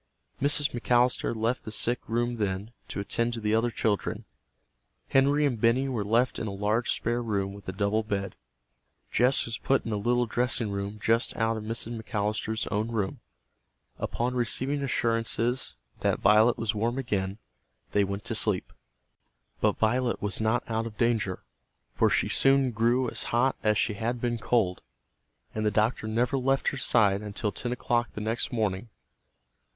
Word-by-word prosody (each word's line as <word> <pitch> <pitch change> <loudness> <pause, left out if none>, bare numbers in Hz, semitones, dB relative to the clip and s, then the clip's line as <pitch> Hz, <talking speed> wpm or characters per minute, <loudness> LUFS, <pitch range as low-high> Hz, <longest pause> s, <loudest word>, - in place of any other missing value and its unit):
Mrs. 145 +1 +3
McAllister 120 0 +2
left 115 +3 -1
the - - -7
sick 120 +3 +1
room 120 +1 0
then, 100 +1 -2 0.2
to - - -5
attend 115 +4 -1
to - - -4
the 105 -1 0
other 115 +2 +2
children. 110 -3 -1 0.8
Henry 140 +2 +4
and 125 -6 -1
Benny 125 +4 +3
were 120 -6 -1
left 115 +5 +1
in 110 - -3
a - - -3
large 105 +4 0
spare 120 +1 0
room 100 -4 -1
with 100 -1 -9
a - - -1
double 100 +3 0
bed. 100 -3 -3 0.8
Jess 125 +2 +3
was 115 -1 -5
put 135 - +1
in 115 - -3
a 105 - 0
little 120 +4 +1
dressing 120 -2 0
room 100 +1 -4
just 115 +3 +1
out 115 -1 +1
of 110 - -5
Mrs. 115 0 -3
McAllister's 110 0 -2
own 105 +1 0
room. 110 -5 -2 0.8
Upon 125 +2 -1
receiving 130 +4 0
assurances 115 - 0 0.2
that - - +1
Violet 110 +3 +5
was 110 -1 -1
warm 115 +4 -1
again, 100 -6 -2 0.5
they 100 - +3
went 100 +1 -4
to - - -2
sleep. 105 -4 0 0.9
But - - +2
Violet 120 +2 +1
was 105 +1 -2
not 110 +3 +1
out 115 0 -1
of 105 - -11
danger, 115 -6 0 0.5
for - - +2
she - - +2
soon 135 -1 +3
grew 120 +3 +2
as - - -1
hot 125 +3 +2
as 105 -1 +2
she 110 - +1
had 120 +3 -2
been 120 -1 -1
cold. 110 -6 +1 0.7
And 110 - -2
the 105 - +3
doctor 110 +2 +1
never 120 +4 +1
left 135 +1 +2
her 140 - -5
side 105 -6 +3
until 105 +1 -3
ten 120 +5 -4
o'clock 120 -1 0
the 105 - -4
next 110 +3 -2
morning. 110 -2 -1
115 Hz, 170 wpm, -28 LUFS, 105-120 Hz, 0.9 s, Violet